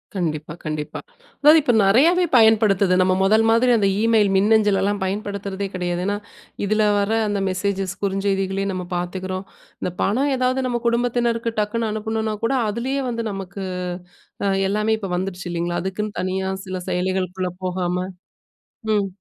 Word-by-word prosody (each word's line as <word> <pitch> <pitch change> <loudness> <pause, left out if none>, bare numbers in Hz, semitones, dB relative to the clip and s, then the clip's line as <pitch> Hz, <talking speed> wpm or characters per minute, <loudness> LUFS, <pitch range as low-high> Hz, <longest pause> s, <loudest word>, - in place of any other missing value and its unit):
கண்டிப்பா, 155 -4 -2
கண்டிப்பா. 155 -1 -4 0.4
அதாது 305 +2 +8
இப்போ 255 -5 +2
நெறையாவே 315 - +4
பயன்படுத்துது. 210 -4 +4
நம்ம 185 0 +3
முதல் 220 +3 +4
மாரி 240 +2 +4
அந்த 200 -2 +2
இமெயில், 220 -2 +3
மின்னஞ்சல் 210 0 +3
எல்லாம் 205 +1 0
பயன்படுத்துறதே 200 0 -3
கிடையாது. 175 -1 -2
ஏன்னா, 205 0 0 0.5
இதில் 215 +1 +2
வர 200 +1 0 0.2
அந்த 205 -1 -1
மெசேஜஸ் 195 0 -2
குறுஞ்செய்திகளயும் 195 0 0
நம்ம 180 -1 -4
பாத்துக்கிறோம். 185 +2 -4 0.4
இந்த 180 - -2
பணம் 265 +8 +1
ஏதாவது 255 +1 0
நம்ம 240 -1 -1
குடும்பத்தினருக்கு 235 -1 +1
டக்குனு 220 +2 -1
அனுப்பணுனா 220 0 -2
கூட 230 +4 +1
அதிலேயே 255 +6 -2
வந்து 230 -1 -3
நமக்கு 195 0 -6 1.0
எல்லாமே 210 +2 0
இப்போ 195 -4 -5
வந்துடுச்சு 180 0 -4
இல்லங்களா? 175 0 -1
அதுக்குன்னு 205 +2 -4
தனியா 190 +1 -2 0.2
சில 185 -1 -4
செயலிகளுக்குள்ள 185 0 -1
போகாம. 180 -1 -1 1.0
ம். 205 -2 +1
200 Hz, 135 wpm, -22 LUFS, 185-225 Hz, 1.0 s, அதாது